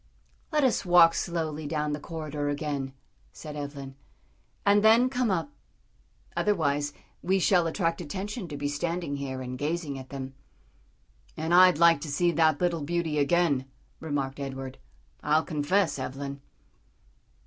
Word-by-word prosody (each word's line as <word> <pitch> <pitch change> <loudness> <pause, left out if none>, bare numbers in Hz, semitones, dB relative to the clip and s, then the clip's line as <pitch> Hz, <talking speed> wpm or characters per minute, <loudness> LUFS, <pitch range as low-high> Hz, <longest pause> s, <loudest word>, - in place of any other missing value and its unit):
"Let 300 -2 +2
us 260 - +2
walk 175 -2 +6
slowly 160 -3 -3
down 150 -1 -1
the 150 - -3
corridor 150 -2 -4
again," 145 -2 -3 0.4
said 150 -1 -9
Evelyn, 140 -2 -6 0.7
"and 205 +1 +4
then 235 +4 +5
come 250 -3 0
up; 190 +8 -1 0.8
otherwise 145 -8 +1 0.3
we 190 +2 +2
shall 180 -2 +3
attract 165 0 -1
attention 195 - -5
to 145 -3 -6
be 145 0 -2
standing 165 0 -2
here 130 -2 -4
and 125 0 -6
gazing 150 -2 -2
at 130 - -11
them." 135 -1 -6 1.0
"And 160 +2 -1
I'd 180 -2 +7
like 170 -3 +5
to 160 - -5
see 175 +5 +2
that 160 -2 +3
little 175 -2 0
beauty 160 0 -1
again," 145 -3 +2 0.3
remarked 145 -3 -3
Edward, 135 -1 -6 0.4
"I'll 155 +2 +2
confess, 160 +1 0
Evelyn." 140 +2 -5
155 Hz, 140 wpm, -27 LUFS, 145-175 Hz, 1.0 s, I'd